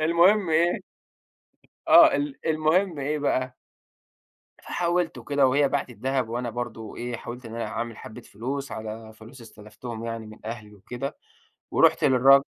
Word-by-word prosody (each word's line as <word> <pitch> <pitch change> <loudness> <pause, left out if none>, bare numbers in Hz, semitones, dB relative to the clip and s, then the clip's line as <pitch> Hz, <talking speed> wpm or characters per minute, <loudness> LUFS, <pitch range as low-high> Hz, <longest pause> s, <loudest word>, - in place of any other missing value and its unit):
المهم 170 +4 +4
إيه 170 +2 +2 1.1
آه. - - +8
ال 145 -1 -2
المهم 160 +2 +1
إيه 150 +2 -1
بقى 130 -3 -1 1.1
فحاولت 175 -1 -1
وكده 140 -2 +2
وهي 140 +2 +3
باعت 140 -2 -1
الدهب 130 +2 -2
وأنا 120 +1 -3
برضه 115 -2 -6
إيه، 120 0 -4
حاولت 120 +2 -8
إن 115 0 -8
أنا 115 -2 -3
أعمل 115 0 -4
حبّة 110 - -10
فلوس 135 +6 -5
على 110 0 -7
فلوس 115 +4 -14
استلفتهم 110 +1 -9
يعني 115 -1 -5
من 110 0 -12
أهلي 110 -2 -7
وكده، 125 +7 -6 0.5
ورُحت - - +4
للراج 135 +2 +6
125 Hz, 145 wpm, -25 LUFS, 115-145 Hz, 1.1 s, آه